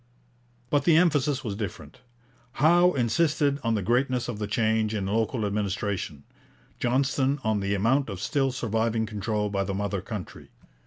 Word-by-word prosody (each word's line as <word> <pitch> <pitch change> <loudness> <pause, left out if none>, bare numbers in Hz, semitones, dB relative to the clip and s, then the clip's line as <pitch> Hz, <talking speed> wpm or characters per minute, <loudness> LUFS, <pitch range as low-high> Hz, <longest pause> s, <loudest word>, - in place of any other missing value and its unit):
But 145 - +2
the 165 -2 +5
emphasis 150 -5 +2
was 105 -5 -3
different. 105 +4 -7 0.5
Howe 175 +5 +4
insisted 140 +3 +1
on 115 -1 +1
the 105 - -1
greatness 125 +2 +1
of 115 -4 -5
the 105 - -2
change 110 0 +1
in 100 -2 -2
local 110 +3 0
administration; 100 -6 -2 0.6
Johnston 135 +2 +1
on 110 -2 +1
the 100 0 -1
amount 120 +7 +1
of 95 -3 -5
still 135 +4 0
surviving 115 -2 -1
control 105 0 -2
by 100 -1 0
the 95 0 -3
mother 100 -1 -2
country. 100 -2 -8
110 Hz, 155 wpm, -26 LUFS, 105-135 Hz, 0.6 s, the